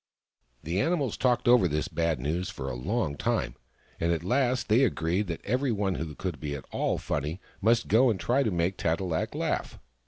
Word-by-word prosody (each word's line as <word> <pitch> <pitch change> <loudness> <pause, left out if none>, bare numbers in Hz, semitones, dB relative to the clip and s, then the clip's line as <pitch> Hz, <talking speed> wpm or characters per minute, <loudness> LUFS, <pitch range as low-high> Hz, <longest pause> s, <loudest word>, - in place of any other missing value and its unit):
The 85 +5 0
animals 150 - 0
talked 125 -1 +1
over 120 -6 +6
this 75 -1 -1
bad 85 -4 0
news 85 +8 -2
for 70 -9 -6
a - - -4
long 80 - -1
time, - - -1 0.5
and 85 +1 +1
at 85 -1 -1
last 125 +5 +1
they 115 +5 +4
agreed 95 -3 0
that 85 -2 -5
every 130 +4 +1
one 100 -3 0
who 80 -4 -5
could 90 -7 -4
be 70 0 -3
at 70 - -8
all - - 0
funny 75 +5 -3 0.2
must 115 +3 +3
go 120 +5 +5
and 105 -5 0
try 125 +10 +2
to 130 - +1
make 90 0 0
Tat 80 0 0
e - - -3
lak 85 -4 -2
laugh. - - -2
95 Hz, 210 wpm, -28 LUFS, 80-120 Hz, 0.5 s, over